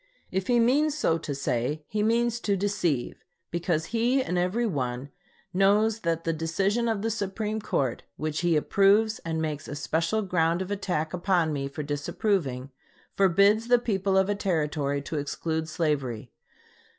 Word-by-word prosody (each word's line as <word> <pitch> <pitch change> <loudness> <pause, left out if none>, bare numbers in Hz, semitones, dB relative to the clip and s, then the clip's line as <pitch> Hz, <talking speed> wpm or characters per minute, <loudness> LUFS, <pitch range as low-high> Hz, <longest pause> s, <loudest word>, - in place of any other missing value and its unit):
If 190 0 -2
he 245 -1 +3
means 285 +6 +3
so 165 - +1
to 145 -2 -4
say, 140 +3 -2
he 210 - -2
means 235 +2 +2
to 200 -4 0
deceive; 180 -9 -1 0.3
because 170 -2 0
he 240 +4 +2
and 180 - -3
every 180 +7 +1
one 130 - -3 0.4
knows 205 +4 +3
that 165 -4 -1
the 165 - 0
decision 195 +9 0
of 220 -3 -1
the 225 - 0
Supreme 215 +1 -3
Court, 135 - -1 0.2
which 155 0 -2
he 175 -2 +2
approves 205 +7 +3
and 160 -1 -3
makes 155 -2 -3
especial 165 +8 -1
ground 170 -1 +1
of 190 - -8
attack 180 -6 -2
upon 175 -3 +1
me 140 -1 -2
for 150 +2 -6
disapproving, 145 - -1 0.4
forbids 200 +4 +4
the 245 0 +6
people 195 -5 0
of 190 0 +4
a 205 - +1
Territory 150 -7 -1
to 155 - -4
exclude 160 +3 -3
slavery. 140 -9 -2
180 Hz, 160 wpm, -27 LUFS, 155-210 Hz, 0.4 s, the